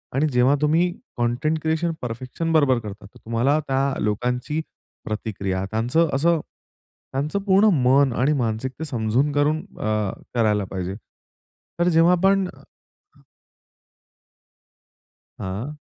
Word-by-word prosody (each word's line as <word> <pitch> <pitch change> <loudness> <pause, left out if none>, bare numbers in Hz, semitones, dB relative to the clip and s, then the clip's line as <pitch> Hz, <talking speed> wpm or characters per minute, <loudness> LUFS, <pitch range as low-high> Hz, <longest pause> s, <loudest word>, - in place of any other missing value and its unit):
आणि 150 +3 +2
जेव्हा 125 +3 +4
तुम्ही 165 +4 +3 0.3
कंटेंट 125 +7 0
क्रिएशन 160 +2 0
परफेक्शन 125 +7 -4
बरोबर 135 -6 +4
करता, 105 -2 -9
तर 100 - -16
तुम्हाला 120 +7 +2
त्या 135 0 +1 0.2
लोकांची, 125 +8 -1 0.4
प्रतिक्रिया 95 -3 -3
त्यांचं 125 +9 +1
असं 165 +4 +3 0.7
त्यांचं 150 +8 -1
पूर्ण 200 +2 +4 0.2
मन 135 +1 +4
आणि 145 +4 +3
मानसिकता 130 +3 -2
समजून 125 +3 0
करून 145 +2 +2 0.2
अ, 105 -2 0 0.2
करायला 105 -3 +2
पाहिजे. 95 0 -3 0.8
तर 175 - +3
जेव्हा 165 +1 +5
आपण 195 +1 +3
अ - - -14 2.8
हां. 105 +11 -5
135 Hz, 115 wpm, -23 LUFS, 110-160 Hz, 2.8 s, जेव्हा